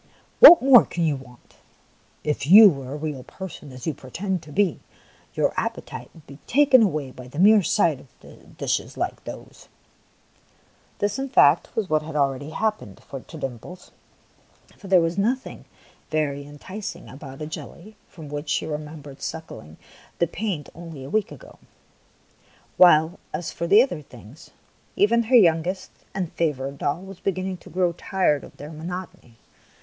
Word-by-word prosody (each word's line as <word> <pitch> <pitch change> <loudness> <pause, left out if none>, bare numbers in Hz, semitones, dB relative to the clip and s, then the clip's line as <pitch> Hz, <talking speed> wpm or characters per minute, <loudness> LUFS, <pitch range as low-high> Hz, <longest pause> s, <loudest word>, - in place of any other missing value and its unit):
What 350 - +11
more 265 -3 +8
can 170 - -4
you 155 -3 +1
want? 125 -2 -15 0.7
If 150 -2 -2
you 205 +5 +10
were 135 -3 -7
a - - -4
real 150 -3 -5
person, 160 -1 -10
as 125 -1 -10
you 160 - -1
pretend 180 +8 -4
to 150 -2 -14
be, 190 0 +1 0.6
your - - +1
appetite - - -5
would 160 - -17
be 140 +1 -13
taken 275 -1 +5
away 155 -10 0
by 125 -1 -12
the 130 - -12
mere 205 +4 +6
sight 170 -7 +1 0.2
of - - -17
dishes - - -2
like - - -3
those! - - -10 0.6
" - - -36
This, 205 +5 -1
in 270 0 -3
fact, 150 - +4
was 220 -4 -1
what 155 -2 +1
had 155 0 -9
already 140 0 0
happened 210 - -3 0.3
to - - -10
Dimples, 135 +8 -8 0.8
for 200 - -13
there 185 -2 +5
was 165 +3 -1
nothing 250 +6 -2 0.4
very 145 -2 -2
entic 185 +8 -8
ing - - -14
about 135 0 -11
a - - -3
jelly 175 +6 -9
from 160 -5 -11
which 145 +1 -6
she - - 0
remembered 150 -2 -7
sucking 80 - -8 0.4
the 170 - +2
paint 175 -4 -4
only 165 -5 -10
a 135 - -9
week 215 -1 0
ago; - - -14 1.2
while 165 0 +5 0.2
as 170 - -4
for 170 - -4
the 205 +6 +7
other 180 - -5
things, 125 -1 -15 0.5
even 230 +3 +3
her 250 +3 +2
youngest 180 -2 +3 0.2
and 180 -4 -3
favourite 140 -4 -2
doll 145 +6 -2
was 195 -1 -11
beginning 185 -1 -3
to - - -16
grow 180 -1 +1
tired 175 -5 0
of - - -14
their 150 +2 -9
monotony. 165 -6 -8
165 Hz, 165 wpm, -23 LUFS, 145-195 Hz, 1.2 s, What